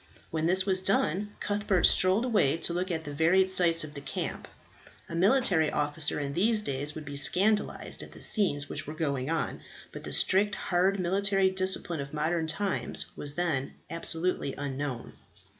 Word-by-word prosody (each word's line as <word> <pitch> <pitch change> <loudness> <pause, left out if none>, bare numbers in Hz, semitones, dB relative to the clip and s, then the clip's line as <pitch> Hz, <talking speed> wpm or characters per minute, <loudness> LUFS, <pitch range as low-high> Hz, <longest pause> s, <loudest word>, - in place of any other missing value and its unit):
When 160 0 -1
this 185 +2 +2
was 190 -2 +1
done, 195 +1 -1
Cuthbert 205 -3 -1
strolled 190 +6 +3
away 205 - +2
to 170 - -1
look 180 +2 -2
at 160 -2 -3
the 145 -2 -7
varied 185 +5 +2
sights 170 -3 +3
of 150 -1 -8
the 140 - -8
camp. 135 - -5 0.6
A - - -9
military 185 - +2
officer 150 +1 +1
in 140 -1 -4
these 215 +6 +1
days 145 -2 -4
would 155 -1 -8
be 145 0 -7
scandalized 205 +9 0
at - - -11
the - - -13
scenes 145 -9 0
which - - -5
were 155 - -6
going 140 -4 -2
on, 165 -1 -3 0.3
but - - -10
the - - -7
strict, 205 +2 +2
hard 190 +2 0
military 195 +1 +1
discipline 185 -3 0
of 140 +2 -7
modern 160 +2 -1
times 195 +5 -2
was 145 0 -5
then 160 -7 -2 0.2
absolutely 165 -3 +5
unknown. 140 -3 -5
170 Hz, 175 wpm, -28 LUFS, 150-190 Hz, 0.6 s, absolutely